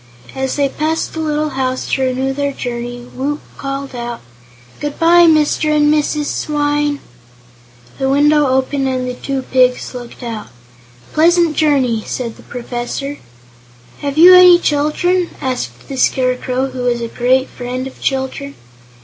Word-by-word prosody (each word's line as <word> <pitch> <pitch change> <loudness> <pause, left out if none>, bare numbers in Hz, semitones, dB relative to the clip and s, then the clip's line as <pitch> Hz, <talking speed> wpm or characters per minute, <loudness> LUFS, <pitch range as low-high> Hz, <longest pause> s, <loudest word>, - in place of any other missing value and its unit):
As 265 0 -2
they 285 -1 +2
passed 310 +4 -2
the 320 - -5
little 305 -1 -1
house 260 -2 -2
to 270 - +1
renew 260 +1 0
their 280 0 -2
journey, 245 -1 -5
Woot 290 +3 -2 0.2
called 275 0 -5
out: 240 -1 -5 0.6
"Good 295 -1 -4
bye, 340 +1 +6
Mr. 310 -1 +3
and 295 0 +4
Mrs. 300 0 0
Swyne!" 290 -1 -1 1.0
The 265 - 0
window 295 +1 +4
opened 265 +1 0
and 255 -1 -2
the 250 - -3
two 270 +1 -4
pigs 255 -1 +1
looked 245 0 -9
out. 225 -3 -5
"A 120 0 -25
pleasant 335 0 +3
journey," 265 -7 +2
said 235 -3 -4
the - - -14
Professor. 245 +4 -5 0.8
"Have 280 0 -4
you 355 +3 +9
any 360 -1 +9
children?" 345 +3 0
asked 125 - -4
the 270 - -6
Scarecrow, 255 +1 0
who 255 - -7
was 245 -1 0
a 230 - -2
great 255 +3 +1
friend 250 +1 -5
of 265 - -10
children. 270 +1 -2
270 Hz, 150 wpm, -16 LUFS, 250-295 Hz, 1.0 s, you